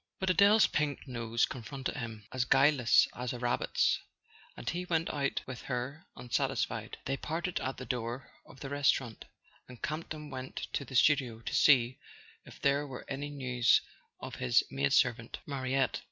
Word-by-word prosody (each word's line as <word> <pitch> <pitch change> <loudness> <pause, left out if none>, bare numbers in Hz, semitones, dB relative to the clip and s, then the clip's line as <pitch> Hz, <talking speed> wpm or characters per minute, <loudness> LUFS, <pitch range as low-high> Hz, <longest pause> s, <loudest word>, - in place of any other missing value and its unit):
But 190 -1 +2
Adele's 200 +4 +6
pink 150 -2 -1
nose 115 -2 0
confronted 130 +2 -5
him, 115 -6 -6
as 130 -1 0
guileless 135 -2 +5
as 125 0 -4
a - - -5
rabbit's, 120 0 +1 0.6
and - - -9
he 175 +1 -1
went 165 -2 0
out 140 -2 -1
with 130 -2 -7
her 130 +6 -4
unsatisfied. 125 -1 -2
They 135 +1 -1
parted 170 +5 -3
at 130 - -3
the 130 - -7
door 120 +1 -4
of 135 - -16
the 135 - -5
restaurant, 135 -4 0 0.4
and 125 -2 -12
Camp 155 +2 -3
ton 150 -1 -7
went 130 0 -7 0.2
to 140 - -2
the 130 - -9
studio 130 -4 +3
to - - -5
see 130 -3 +5 0.5
if - - -13
there 140 +1 +2
were 130 -2 -8
any 140 +1 -4
news 125 -4 +3 0.4
of - - -7
his 60 -1 +3
maid 70 +1 0
servant 120 -2 +2
Mariette. 135 -1 0
130 Hz, 170 wpm, -31 LUFS, 120-145 Hz, 0.6 s, Adele's